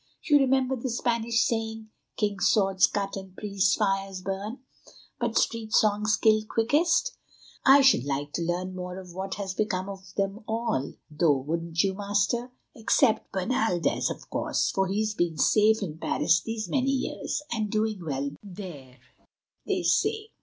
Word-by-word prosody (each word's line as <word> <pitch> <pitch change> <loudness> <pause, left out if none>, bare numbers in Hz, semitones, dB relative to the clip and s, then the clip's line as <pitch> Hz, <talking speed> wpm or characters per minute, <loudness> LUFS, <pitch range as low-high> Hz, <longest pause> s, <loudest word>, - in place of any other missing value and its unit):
You 295 -3 +5
remember 265 -1 +2
the 260 +1 -4
Spanish 235 -1 +1
saying, 220 -1 -3 0.3
'King's 205 -2 +1
swords 195 -2 +4
cut 200 -1 -3
and 190 -1 -9
priests' 195 -2 +1
fires 195 -2 -1
burn, 200 +6 -4 0.6
but - - -1
street 225 -2 0
songs 210 0 +3
kill 215 -1 +3
quickest!' 335 - +2 0.5
I 275 +1 +8
should 265 - +5
like 145 +1 -3
to - - -2
learn 175 +2 -2
more 180 0 -6
of 185 -2 -10
what 190 +1 -4
has 195 -2 -4
become 190 -2 -1
of 190 -1 -9
them 200 +2 -2
all, 220 - -1 0.2
though, 150 -1 +3
wouldn't 165 +5 -1
you, 195 -1 +1
Master? 205 +5 -1 0.2
Except 225 0 +2
Bernaldez, 190 - 0
of - - -7
course, - - 0
for 190 0 0
he's 210 +2 -1
been 175 -5 -1
safe 220 0 +4
in 160 -4 -6
Paris 165 +1 +2
these 225 -1 -4
many 270 -1 0
years, 275 +2 -2
and 220 -3 -1
doing 215 -3 -1
well 140 -2 -2
there, 175 -10 -10 0.7
they - - 0
say." 435 0 +1
205 Hz, 155 wpm, -27 LUFS, 185-225 Hz, 0.7 s, I